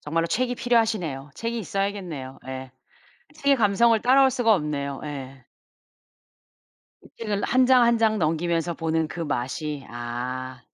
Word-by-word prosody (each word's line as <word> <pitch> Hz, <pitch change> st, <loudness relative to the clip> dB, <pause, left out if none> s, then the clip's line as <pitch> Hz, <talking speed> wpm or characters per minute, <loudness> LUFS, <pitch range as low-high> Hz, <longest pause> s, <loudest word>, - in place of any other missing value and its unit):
정말로 165 Hz, +3 st, -1 dB
책이 245 Hz, +7 st, 0 dB
필요하시네요. 215 Hz, -, 0 dB
책이 230 Hz, +1 st, -3 dB
있어야겠네요. 185 Hz, -9 st, -4 dB
예 130 Hz, 0 st, -6 dB, 0.7 s
책의 280 Hz, -2 st, +3 dB
감성을 225 Hz, +1 st, +4 dB
따라올 265 Hz, +2 st, +5 dB
수가 240 Hz, -3 st, +3 dB
없네요. 145 Hz, -5 st, -2 dB
예. 135 Hz, -3 st, -8 dB, 1.6 s
이 -, -, -16 dB
책을 210 Hz, -3 st, -2 dB
1 255 Hz, +1 st, +3 dB
장 255 Hz, -1 st, +6 dB
1 235 Hz, 0 st, +4 dB
장 220 Hz, -1 st, +2 dB
넘기면서 165 Hz, +1 st, 0 dB
보는 160 Hz, -1 st, -1 dB
그 175 Hz, -, -7 dB
맛이 145 Hz, 0 st, -3 dB
아 125 Hz, +2 st, -5 dB
170 Hz, 275 characters per minute, -25 LUFS, 140-230 Hz, 1.6 s, 장